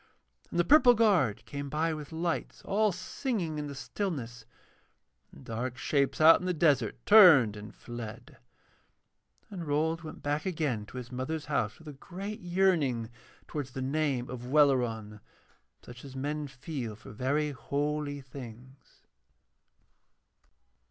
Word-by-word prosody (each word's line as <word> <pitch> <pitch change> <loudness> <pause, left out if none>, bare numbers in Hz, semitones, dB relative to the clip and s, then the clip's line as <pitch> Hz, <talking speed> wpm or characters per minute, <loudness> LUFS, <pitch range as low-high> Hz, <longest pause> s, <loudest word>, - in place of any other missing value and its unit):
And 175 - -2
the - - +5
purple 255 -4 +7
guard 180 - +2
came 140 0 -6
by 160 +3 0
with 150 -1 -7
lights, 165 +1 -3
all 210 +1 +2
singing 185 - -3
in 150 - -4
the 140 - -7
stillness, 130 - -4 0.9
and - - -15
dark 120 +3 -4
shapes 140 0 0
out 160 +1 +8
in 180 - -5
the 180 - 0
desert 150 -3 +2
turned 165 - +8
and 105 +1 -10
fled. 120 -3 -9 1.1
And 175 -5 -6
Rold 160 +3 0
went 160 - -10
back 145 +1 -1
again 150 - -2
to - - -10
his 125 -1 -7
mother's 130 +5 -4
house 110 -8 -1
with 160 - -16
a 150 - -7
great 195 +9 -7
yearning 170 -11 +1 0.4
towards 140 -4 -5
the 130 - -4
name 135 -3 0
of 125 -1 -7
Welleran, 120 -7 +2 0.6
such 120 0 -12
as 135 -2 -10
men 145 +2 -3
feel 130 -4 -6
for 105 - -13
very 140 +7 0
holy 145 +2 -2
things. 130 0 -12
145 Hz, 140 wpm, -30 LUFS, 125-165 Hz, 1.1 s, out